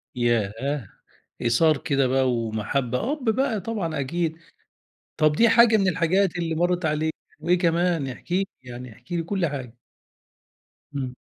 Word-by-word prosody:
ياه! 120 +2 0 0.5
إيثار 150 +7 +3
كده 135 -2 +1
بقى 130 0 +2
ومحبة، 120 - -1
أب 295 -4 -5
بقى 225 -1 +1
طبعًا 180 -8 -3
أكيد، 160 +3 -1 0.8
طَب 155 -1 +4
دي 230 +10 +4
حاجة 230 -1 +6
من 195 -2 +2
الحاجات 180 +2 +2
اللي 165 -2 -1
مرّت 175 +1 0
عليك، 155 +1 0 0.3
وإيه 175 +3 +2
كمان 170 -3 +1
احكِ 130 +7 -9
لي 195 +2 +2 0.2
يعني، 125 -1 -9
احكِ 125 +8 -14
لي 170 - 0
كُلّ 180 +1 -1
حاجة. 130 -5 -5 1.2
إمم. 130 -2 -3
160 Hz, 145 wpm, -24 LUFS, 130-180 Hz, 1.2 s, حاجة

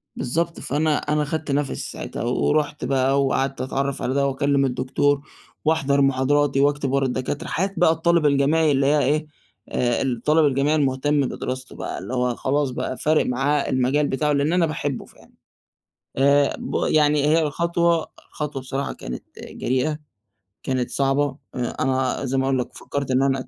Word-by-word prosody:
بالضبط 165 +6 -2
فأنا 150 +2 0
أنا 150 0 0
خدت 155 0 -3
نفْسي 140 0 0
ساعتها، - - -6
ورُحت 145 +5 0
بقى 135 +1 +2
وقعدت 135 0 -1
أتعرف 135 +1 -2
على 130 - -1
ده 140 0 +2
وأكلم 140 0 +1
الدكتور، 140 +2 0 0.4
وأحضر 140 -3 +2
محاضراتي 135 +1 +2
وأكتب 145 -1 +1
ورا 140 0 +2
الدكاترة، 130 +2 -3
حياة 190 +4 -1
بقى 165 -1 +5
الطالب 165 0 +2
الجامعي 145 +2 +3
اللي 135 -1 +2
هي 150 +1 +3
إيه، 150 +3 +1 0.4
آآ، 120 -1 0
الطالب 135 +5 +2
الجامعي 140 +2 +2
المهتم 145 0 +1
بدراسته 130 0 -5
بقى - - -5
اللي 130 - -7
هو 125 -1 0
خلاص 140 0 0
بقى 125 +1 -4
فارق 155 +1 +2
معاه 135 +3 0
المجال 130 +3 +1
بتاعه، 150 +3 0
لأن 145 +3 +1
أنا 180 -2 +3
باحبه 145 -4 -3
فعلًا، - - -20 0.9
آآ 140 +1 +3
ب - - -6
يعني 150 -1 +3
هي 160 +2 +4
الخطوة، 170 +2 +1 0.2
الخطوة 150 -3 -4
بصراحة 135 +1 -3
كانت 60 - -7 0.2
آآ، - - -10
جريئة، 130 +5 -1 0.7
كانت 130 -2 -1
صعبة، 140 0 +1 0.2
آآ، 125 -2 -3
أنا 130 0 0
زي 135 +1 -1
ما 130 - +2
أقول 135 -1 +1
لك 125 - -4
فكرت 140 -2 -4
إن 130 +1 +3
أنا 135 -1 0
140 Hz, 165 wpm, -23 LUFS, 130-150 Hz, 0.9 s, بقى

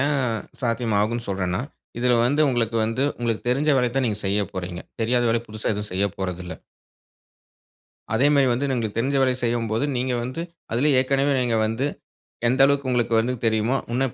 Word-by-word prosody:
ஏன் 145 +1 +2 0.5
சாத்தியம் 115 -2 0
ஆகும்னு 115 +3 -1
சொல்றன்னா, 95 0 -1 0.4
இதுல 125 0 +3
வந்து, 145 +5 +2
உங்களுக்கு 115 -3 0
வந்து, 115 +5 0
உங்களுக்கு 120 -1 -2
தெரிஞ்ச 140 +5 +1
வேலைய 125 -2 +1
தான் 135 - +2
நீங்க 105 -1 -3
செய்ய 100 +2 +1
போறீங்க. 90 -1 -5 0.2
தெரியாத 120 +2 +2
வேலை 115 0 +1
புதுசா 110 0 -3
எதுவும் 105 0 -5
செய்யப்போறதில்ல. 90 -2 -3 1.6
அதே 130 +5 +4
மாரி 140 -2 +4
வந்து 135 +4 -1
உங்களுக்கு 115 -5 -2
தெரிஞ்ச 135 +4 +1
வேல 130 - +3
செய்யும்போது, 115 +1 0
நீங்க 125 +1 0
வந்து, 130 +6 -4 0.3
அதிலே 140 +6 +3
ஏற்கனவே 135 +2 +2
நீங்க 120 -2 +1
வந்து, 115 +6 -1 0.6
எந்த 130 +3 +2
அளவுக்கு 140 -1 +1
உங்களுக்கு 120 -2 +1
வந்து 125 +3 0
தெரியுமோ, 110 +3 +2 0.2
இன்னும் 130 0 0
120 Hz, 165 wpm, -23 LUFS, 110-130 Hz, 1.6 s, அதே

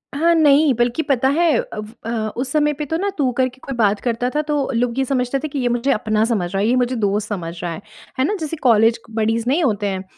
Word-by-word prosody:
हाँ, 335 +4 +3
नहीं, 295 -2 +5
बल्कि 240 +5 0
पता 265 -3 +1
है 330 +4 +2
अब 480 - -5 0.2
अ, - - -3 0.3
उस 255 +1 -3
समय 295 0 +2
पे 295 +1 -5
तो 320 +3 -2
ना 400 +3 -1
तू 270 -4 +1
करके 255 0 0
कोई 270 - -4
बात 210 -2 +2
करता 245 0 -1
था 300 - +2
तो 295 -2 -1
लोग 240 +1 0
ये - - +3
समझते 255 0 -1
थे 310 - -4
कि 285 -1 -4
ये 250 - 0
मुझे 240 +3 0
अपना 215 0 +1
समझ 200 -7 -1
रहा 195 - 0
है, 210 - +1
ये 245 - +3
मुझे 255 0 +1
दोस्त 210 -1 -1
समझ 175 -5 -4
रहा 175 - -3
है। 160 - -8 0.4
है 260 - +3
ना? 415 +7 0
जैसे 315 0 -4
कॉलेज 230 -2 +4
क 225 - -18
बडीज़ 225 +1 0
नहीं 305 +6 +2
होते 210 -6 0
हैं, 190 -1 -3
250 Hz, 265 wpm, -20 LUFS, 220-290 Hz, 0.4 s, नहीं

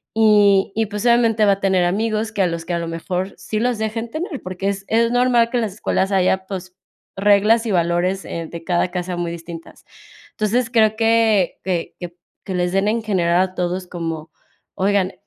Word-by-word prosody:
Y 205 -3 +4
y, 220 0 0
pues, 210 +2 -5
obviamente 230 -2 +4
va 200 - +5
a 195 - -5
tener 190 -2 +2
amigos 215 +4 -1
que 210 -2 -1
a - - +2
los 170 -1 -4
que 175 - -3
a 170 - 0
lo 170 - -4
mejor 180 +3 -4
sí 195 +4 -4
los 245 0 0
dejen 220 +1 -3
tener, 315 - -5
porque 185 +2 -3
es 200 0 -4
es 230 +1 +2
normal 245 -1 +3
que 245 - +1
las 220 -5 -2
escuelas 195 -1 -1
haya, 190 0 +1
pues, 185 -2 -7 0.4
reglas 210 +3 +4
y - - -1
valores, 175 +2 0
eh, 165 -1 -5
de 170 -1 -8
cada 180 0 0
casa 180 0 -3
muy 175 -1 -2
distintas. 165 0 -10 0.5
Entonces, 225 +3 0
creo 220 -3 +3
que 225 -4 +2
que 175 -2 -3 0.5
que 190 - -4
les 180 0 0
den 195 +1 +1
en 225 +2 +1
general, 180 -4 +2
a 185 0 -2
todos 180 +1 -2
como, 165 -2 -5 0.4
oigan, 195 -1 +1
195 Hz, 195 wpm, -20 LUFS, 180-220 Hz, 0.5 s, va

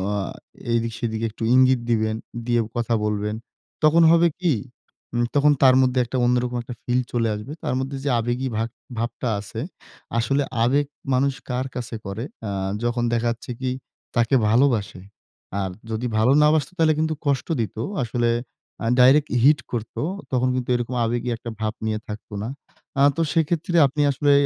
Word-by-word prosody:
আ - - 0 0.6
এদিক-সেদিক 115 -1 -1
একটু 110 +1 -8
ইঙ্গিত 130 0 +5
দিবেন, 110 -1 +1 0.3
দিয়ে 120 -1 +2 0.2
কথা 115 0 0
বলবেন। 105 0 -1 0.5
তখন 165 +2 +6
হবে 170 0 +5
কি? 175 -5 +2 0.6
উম 120 0 +1
তখন 145 +1 +5
তার 130 -1 +7
মধ্যে 130 0 +2
একটা 125 +2 -3
অন্যরকম 125 0 +1
একটা 120 +1 -8
ফিল 125 +1 +1
চলে 115 -2 +1
আসবে। 105 +6 -7
তার - - -1
মধ্যে, 135 +1 -3
যে 145 - 0
আবেগী 120 +3 -1
ভাব 115 +1 -1 0.3
ভাবটা 120 +1 -2
আছে, 105 +2 -7 0.6
আসলে 135 +5 +1 0.2
আবেগ 140 +5 +3 0.3
মানুষ 135 +2 +2 0.2
কার 125 +1 -1
কাছেই 120 -3 -5
করে, 100 +4 -4 0.2
অ্যাঁ 95 -2 -2
যখন 120 0 0
দেখা 120 0 +1
যাচ্ছে 120 +1 -7
কি 130 -1 0 0.4
তাকে 120 +2 +3
ভালোবাসে। 115 -6 +2 0.6
আর 95 -1 -2 0.2
যদি 110 +2 -2
ভালো 110 +4 +4
না - - +6
বাসত, 150 -4 +1
তাহলে 160 -2 +4
কিন্তু 160 0 +1
কষ্ট 140 -3 0
দিত। 110 - -4 0.3
আসলে 120 0 0 0.5
আ - - -1
ডাইরেক্ট 140 +4 +6
হিট 145 0 +6
করতো। 115 -2 -4 0.3
তখন 125 0 +2
কিন্তু 125 -1 -3
এরকম 120 +1 -2
আবেগী 120 +2 -1
একটা 120 -1 -7
ভাব 110 0 -1
নিয়ে 110 -1 -1
থাকত 105 0 -8
না। - - -3 0.5
অ্যাঁ 140 +1 +5
তো 165 - +2
সেক্ষেত্রে 165 +1 0
আপনি 145 +3 -2
আসলে 145 +2 +2
120 Hz, 170 wpm, -23 LUFS, 115-135 Hz, 0.6 s, তার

